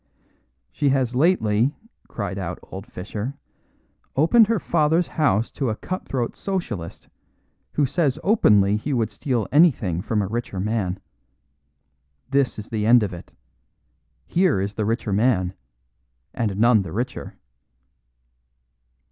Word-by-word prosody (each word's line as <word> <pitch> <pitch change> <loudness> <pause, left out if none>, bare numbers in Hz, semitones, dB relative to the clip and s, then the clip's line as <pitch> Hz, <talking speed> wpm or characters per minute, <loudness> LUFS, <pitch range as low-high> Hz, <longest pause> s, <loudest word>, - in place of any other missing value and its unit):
"She 145 - +1
has 130 -3 +1
lately," 130 - +2 0.3
cried 100 -3 -4
out 90 -1 -4
old 95 +4 -9
Fischer, 110 +5 -6 0.8
"opened 205 - +5
her 230 0 +1
father's 160 +2 +1
house 115 -8 +1
to 135 -4 -2
a 110 - -1
cut 185 +10 -6
throat 125 -3 -2
Socialist, 125 - -5 0.7
who 145 - +2
says 140 -1 0
openly 105 - +4
he 140 +7 -3
would 115 -3 0
steal 120 +2 -2
anything 130 - +3
from 105 0 -1
a - - -3
richer 115 -2 -4
man. 95 -2 -1 1.3
This 140 -2 +1
is 105 - -8
the 110 -1 -1
end 120 -1 +6
of 100 - -3
it. 85 - -10 0.9
Here 180 - +2
is 100 +2 -2
the 105 0 -2
richer 110 -1 -1
man 100 -4 +2 0.8
and 105 -4 -2
none 115 0 +5
the 90 -4 -6
richer." 125 +7 -4
115 Hz, 130 wpm, -23 LUFS, 100-140 Hz, 1.3 s, end